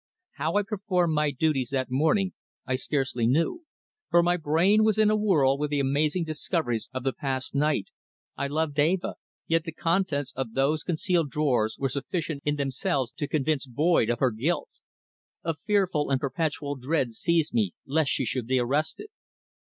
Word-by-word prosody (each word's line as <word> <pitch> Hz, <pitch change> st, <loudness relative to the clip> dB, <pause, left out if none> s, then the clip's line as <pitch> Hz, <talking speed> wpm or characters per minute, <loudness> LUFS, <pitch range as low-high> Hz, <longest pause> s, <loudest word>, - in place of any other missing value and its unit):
How 160 Hz, +4 st, -1 dB
I 205 Hz, -, +3 dB
performed 190 Hz, -5 st, 0 dB
my 150 Hz, -1 st, +2 dB
duties 140 Hz, -3 st, 0 dB
that 130 Hz, -2 st, -2 dB
morning 160 Hz, +8 st, +2 dB, 0.3 s
I 130 Hz, -, 0 dB
scarcely 130 Hz, -4 st, -1 dB
knew, 165 Hz, -, +1 dB, 0.4 s
for 170 Hz, 0 st, +5 dB
my 175 Hz, +1 st, +3 dB
brain 175 Hz, +7 st, +3 dB
was 215 Hz, -1 st, +3 dB
in 215 Hz, -1 st, +4 dB
a -, -, +3 dB
whirl 155 Hz, -11 st, +3 dB
with 150 Hz, 0 st, -1 dB
the 145 Hz, -1 st, 0 dB
amazing 150 Hz, +5 st, +1 dB
discoveries 155 Hz, -, -2 dB
of 130 Hz, -1 st, -4 dB
the 135 Hz, -1 st, 0 dB
past 130 Hz, -2 st, -3 dB
night, 145 Hz, -6 st, 0 dB, 0.4 s
I 140 Hz, -, -2 dB
loved 150 Hz, 0 st, -1 dB
Eva, 170 Hz, +5 st, +2 dB, 0.3 s
yet 165 Hz, 0 st, +1 dB
the 165 Hz, -, -5 dB
contents 160 Hz, -5 st, 0 dB
of 130 Hz, -4 st, -4 dB
those 140 Hz, +4 st, +1 dB
concealed 170 Hz, -2 st, 0 dB
drawers 125 Hz, -7 st, +1 dB
were 135 Hz, -, 0 dB
sufficient 145 Hz, +2 st, -3 dB
in 145 Hz, 0 st, +1 dB
themselves 135 Hz, -2 st, -1 dB
to 145 Hz, +1 st, -4 dB
convince 150 Hz, -1 st, 0 dB
Boyd 145 Hz, -1 st, +2 dB
of 120 Hz, -, +1 dB
her 130 Hz, 0 st, +2 dB
guilt. 135 Hz, +11 st, -1 dB, 0.7 s
A 165 Hz, -, 0 dB
fearful 185 Hz, -4 st, 0 dB
and 135 Hz, -1 st, +2 dB
perpetual 145 Hz, 0 st, -2 dB
dread 130 Hz, -1 st, 0 dB
seized 165 Hz, +6 st, +1 dB
me 105 Hz, -6 st, +1 dB
lest 150 Hz, 0 st, +1 dB
she 135 Hz, -, 0 dB
should 120 Hz, 0 st, -2 dB
be 130 Hz, +1 st, +2 dB
arrested. 145 Hz, -, -1 dB
150 Hz, 175 wpm, -27 LUFS, 135-165 Hz, 0.7 s, for